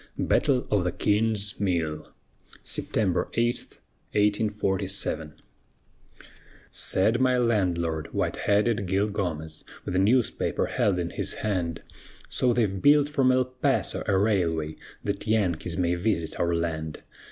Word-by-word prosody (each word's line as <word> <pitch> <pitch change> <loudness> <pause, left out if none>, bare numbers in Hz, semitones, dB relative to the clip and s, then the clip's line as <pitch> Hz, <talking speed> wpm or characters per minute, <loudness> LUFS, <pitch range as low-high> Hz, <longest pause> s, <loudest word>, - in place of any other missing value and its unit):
BATTLE 130 -4 +2
OF 105 -3 +3
THE 90 - 0
KING'S 105 0 +1
MILL 85 -6 -1 0.5
[September - - 0
8, 120 +1 +2 0.6
1847] 100 -6 0 1.4
Said 110 +6 +2
my 130 -1 +3
landlord, 90 -9 0
white - - -1
headed 105 0 +1
Gil 100 +3 +1
Gomez, 80 -6 -4 0.2
With - - -3
newspaper 110 +6 +2
held 100 -3 +1
in 85 -1 -2
his - - -2
hand 85 -6 -2 0.5
"So 125 - +2
they've 105 -6 0
built 145 0 +5
from 135 -3 +3
El 130 0 +3
Paso 130 0 -1
a 95 - +3
railway 85 -7 +1 0.3
That 100 +2 -3
Yankees 90 -6 0
may 90 -1 +1
visit 85 -3 -1
our 85 0 +1
land. 80 -2 -3
100 Hz, 120 wpm, -26 LUFS, 85-110 Hz, 1.4 s, built